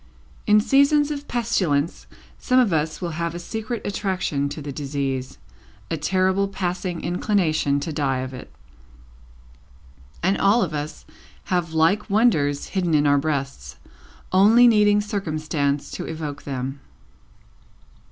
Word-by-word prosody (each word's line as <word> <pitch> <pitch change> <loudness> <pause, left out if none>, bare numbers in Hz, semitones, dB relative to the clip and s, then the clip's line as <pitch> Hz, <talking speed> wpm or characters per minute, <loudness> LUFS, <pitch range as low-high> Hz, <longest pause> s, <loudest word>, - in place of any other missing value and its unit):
In 210 0 +6
seasons 280 +5 +3
of 290 -1 -5
pestilence, 175 -10 -1 0.3
some 255 - +1
of 230 -8 +3
us 155 +2 -1
will 170 - -2
have 170 0 -2
a - - -3
secret 220 +6 -5
attraction 185 -8 -1
to 145 - -7
the 145 -1 -6
disease 135 -2 -3 0.5
a - - +1
terrible 185 +5 +1
passing 180 -2 -3
inclination 170 -6 +1
to 155 +2 -4
die 135 -3 0
of 130 0 -6
it. 125 - -10 1.7
And 190 +3 +2
all 205 +4 +4
of 170 -3 -3
us 150 +1 -5 0.5
have 170 -2 0
like 190 +8 +2
wonders 165 -10 +2
hidden 180 -4 0
in 150 0 +3
our 145 0 +4
breasts, 140 -2 -3 0.6
only 215 +6 +6
needing 210 -2 +4
circumstances 155 -8 -2
to - - -5
evoke 150 -3 -5
them. 135 0 -4
170 Hz, 135 wpm, -23 LUFS, 145-205 Hz, 1.7 s, In